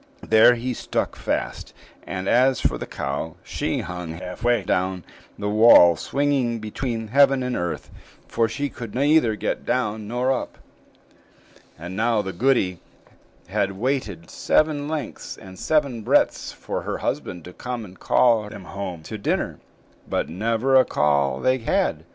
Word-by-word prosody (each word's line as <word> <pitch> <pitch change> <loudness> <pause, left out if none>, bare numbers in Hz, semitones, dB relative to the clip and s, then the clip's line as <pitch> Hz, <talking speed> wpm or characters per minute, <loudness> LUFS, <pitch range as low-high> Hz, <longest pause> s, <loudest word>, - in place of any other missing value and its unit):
There 110 +2 +6
he 125 +2 -3
stuck - - -2
fast; - - -3 0.3
and 95 0 -4
as 130 +1 +4
for - - 0
the - - -6
cow, 75 +4 -4
she - - -2
hung 90 -2 -6
half 90 +4 -8
way 120 -3 +2
down 95 -1 -1 0.3
the 105 - -3
wall, 105 -5 +7
swinging 135 - 0
between 115 +1 -4
heaven 135 +1 +4
and 125 0 -2
earth, 85 -1 -4 0.4
for 115 -1 +1
she 140 +6 -2
could 115 -5 -8
neither 140 -4 +3
get - - -3
down 110 -4 -1
nor 125 +3 0
up. 130 - -3 1.2
And 85 +3 -7
now 110 0 +1
the 95 -1 -5
goody 95 -5 +1 0.7
had 100 -1 0
waited 105 - -3
seven 150 -2 +1
lengths 155 -1 -5
and 95 -1 -12
seven 140 -7 +1
breadths - - +2
for - - -5
her - - -3
husband 90 -3 -4
to 90 - -10
come 125 0 -5
and 95 -1 -15
call 115 -4 +3
them 105 - -10
home 90 -4 -6
to 110 +6 -7
dinner; - - -1 0.5
but - - -1
never 115 +8 0
a 130 - +7
call 70 - +1
they 130 0 +2
had. 115 - 0
110 Hz, 155 wpm, -23 LUFS, 95-130 Hz, 1.2 s, wall